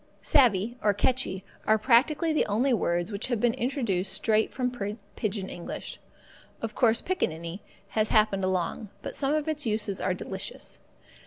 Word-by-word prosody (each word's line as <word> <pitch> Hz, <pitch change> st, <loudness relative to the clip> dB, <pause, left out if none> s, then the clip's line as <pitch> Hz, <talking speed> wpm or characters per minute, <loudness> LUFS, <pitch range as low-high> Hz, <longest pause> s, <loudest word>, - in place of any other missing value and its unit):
Savvee 235 Hz, -3 st, +3 dB
or 205 Hz, -1 st, +3 dB
catchee 205 Hz, -4 st, 0 dB, 0.2 s
are 220 Hz, -, +5 dB
practically 275 Hz, +8 st, +3 dB
the 305 Hz, -, +2 dB
only 240 Hz, +6 st, +2 dB
words 175 Hz, -2 st, 0 dB
which 200 Hz, 0 st, -3 dB
have 240 Hz, -4 st, 0 dB
been 235 Hz, +1 st, +3 dB
introduced 235 Hz, -7 st, -1 dB
straight 220 Hz, -1 st, +2 dB
from 250 Hz, -1 st, -1 dB, 0.4 s
pigeon 200 Hz, -2 st, -2 dB
English. 175 Hz, -, -6 dB, 0.6 s
Of 225 Hz, -1 st, -4 dB
course, 225 Hz, 0 st, +3 dB
pickaninny 170 Hz, -, -2 dB, 0.3 s
has 215 Hz, -1 st, +1 dB
happened 210 Hz, -3 st, +3 dB
along, 185 Hz, +2 st, -1 dB
but -, -, -5 dB
some 280 Hz, +1 st, 0 dB
of 305 Hz, 0 st, -1 dB
its 300 Hz, -4 st, -2 dB
uses 210 Hz, -3 st, -1 dB
are 185 Hz, -1 st, 0 dB
delicious. 190 Hz, +1 st, -6 dB
215 Hz, 155 wpm, -28 LUFS, 195-255 Hz, 0.6 s, are